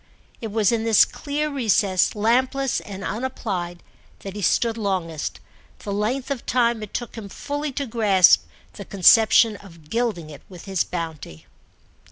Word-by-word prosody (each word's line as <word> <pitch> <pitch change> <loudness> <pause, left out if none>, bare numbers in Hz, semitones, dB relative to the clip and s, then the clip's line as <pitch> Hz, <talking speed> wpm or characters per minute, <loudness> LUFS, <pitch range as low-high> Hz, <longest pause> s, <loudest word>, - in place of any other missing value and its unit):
It 225 - -4
was 215 -1 +2
in 230 -1 0
this 225 -2 +5
clear 300 +1 -4
recess, 210 -9 +1
lampless 255 +5 +1
and 195 -1 -9
unapplied, 200 -8 -4 0.4
that 195 0 -8
he 205 - -5
stood 225 +5 +1
longest—the 190 0 -5
length 245 +7 -2
of 265 -4 -3
time 235 -2 +1
it 215 - -8
took 240 - -4
him 215 -3 -8
fully 290 +6 -4
to 280 +1 -3
grasp 210 -6 +4 0.3
the 200 - -9
conception 215 +3 +5
of 165 -6 -17
gilding 220 -10 -2
it 145 - -12
with 180 -3 -12
his 190 -3 0
bounty. 160 - -7
215 Hz, 150 wpm, -23 LUFS, 185-240 Hz, 0.4 s, this